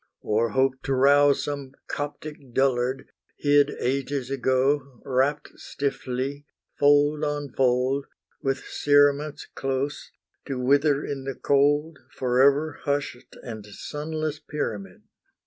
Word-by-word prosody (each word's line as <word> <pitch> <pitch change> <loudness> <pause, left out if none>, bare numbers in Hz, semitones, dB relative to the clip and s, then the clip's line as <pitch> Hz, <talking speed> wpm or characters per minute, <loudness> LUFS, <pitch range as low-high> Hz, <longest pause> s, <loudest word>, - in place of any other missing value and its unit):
Or 110 +2 +1
hope 130 0 +1
to 135 - +1
rouse 140 +2 +5
some 140 -2 -5
Coptic 145 -3 -6
dullard, 130 0 +1 0.3
hid 145 0 +4
Ages 135 0 -2
ago, 135 0 0
wrapt 135 +3 0
stiffly, 140 +1 -3 0.3
fold 145 +1 +4
on 145 -2 -2
fold, 130 +2 +1 0.3
With 135 -1 -1
cerements 145 +1 +2
close, 135 +2 -3 0.4
to 135 -2 -3
wither 140 +3 +2
in 135 -2 -5
the 135 -1 -4
cold 145 +2 +2 0.2
Forever 140 +4 +2
hushed, 140 -3 -3
and 110 -3 -7
sunless 150 +7 -4
pyramid! 105 -13 -5
140 Hz, 110 wpm, -25 LUFS, 130-145 Hz, 0.4 s, rouse